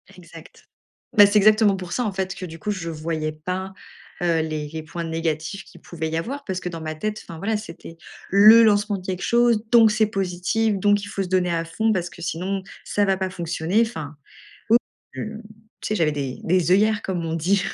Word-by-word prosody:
Exact. - - -15 0.5
Bah, 205 - +10
c'est 205 +1 +3
exactement 215 0 +5
pour 180 -2 -6
ça 245 - 0
en 210 - -1
fait 190 -1 -3
que 185 - -6
du 165 -1 -10
coup 210 - -5
je 170 -4 -4
voyais 155 -1 -3
pas, 185 +5 -5 0.5
heu, 170 -2 +2
les 155 -1 -3
les 160 +1 -6
points 170 +2 -6
négatifs 165 +3 -3
qu'il - - -17
pouvait 160 -2 -5
y 160 - -2
avoir 270 +12 -4
parce 185 -2 -3
que 180 - -6
dans 165 -2 -7
ma 155 0 -4
tête, 215 +5 -4
enfin, 165 - -9
voilà, 220 +5 -1
c'était 170 -5 -10 0.3
le 215 +4 +8
lancement 205 -1 +2
de 185 - -12
quelque 185 -1 -4
chose, 235 -2 +3
donc 230 -2 +7
c'est 215 0 +2
positif, 195 +2 -1
donc 205 +1 +2
il - - -6
faut 195 -1 -3
se 180 - -7
donner 180 -2 +1
à 165 - 0
fond 220 +6 0
parce 175 -2 -2
que 160 +3 -14
sinon 185 +4 -3 0.2
ça 205 - +1
va 195 -1 +2
pas 190 -1 -2
fonctionner. 175 +3 -1
Enfin, 155 -10 -3 0.6
ou 230 - +8 0.4
je - - -7 0.6
tu - - -3
sais 215 - 0
j'avais 155 -4 +2
des 135 -3 -4
des 180 0 +2
œillères 215 +3 +3
comme 180 -3 -3
on 160 - -2
dit. 185 +5 +1
185 Hz, 220 wpm, -23 LUFS, 165-205 Hz, 0.6 s, Bah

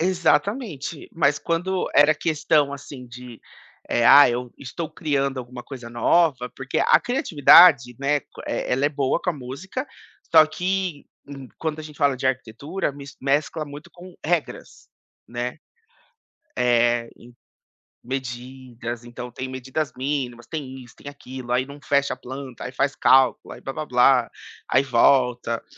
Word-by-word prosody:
Exatamente. 180 - -1
Mas 145 -2 +2
quando 180 +3 -1
era 150 +1 +6
questão 150 -2 +1
assim 135 -2 -9
de, 120 -1 -11 0.5
eh: 120 - +2
"Ah, 145 0 +9
eu 120 0 -4
estou 155 +4 -6
criando 140 -4 -1
alguma 125 0 -8
coisa 125 -3 -9
nova" 125 +2 +2
porque 135 0 -3
a - - +4
criatividade, 160 - +5
né, 145 +1 +1
co - - -14
eh, - - -2
ela 135 +3 +1
é - - +3
boa 140 +1 -1
com 180 - 0
a - - -2
música, 160 - -6 0.5
só 160 -1 +8
que 180 -2 -3 0.5
quando 160 -1 -3
a - - -7
gente 150 -1 -12
fala 140 -3 +2
de 130 - -2
arquitetura, 135 +7 -3
mis 140 0 -11
mescla 145 +3 0
muito 145 +1 -11
com 180 0 -13
regras, 165 -1 -3 0.4
né. 120 +4 -4 1.0
Eh, 120 -1 +2
em 120 - -16 0.8
medidas, 125 -2 -6
então, 120 +1 -8
tem 130 +2 -6
medidas 130 +3 -4
mínimas, 130 -3 -3
tem 135 -4 -6
isso, 120 - -17
tem - - -14
aquilo, 130 -3 -9
aí 125 +1 +2
não 140 +1 -11
fecha 140 -1 +1
a - - -26
planta, 130 -1 -8
aí 125 - -5
faz 140 +1 0
cálculo, 130 -1 +3
aí - - -13
blá 135 - -5
blá 155 +2 -5
blá, 125 -1 +3 0.4
aí 130 - +3
volta. 125 -2 +2
135 Hz, 155 wpm, -23 LUFS, 125-155 Hz, 1.0 s, Ah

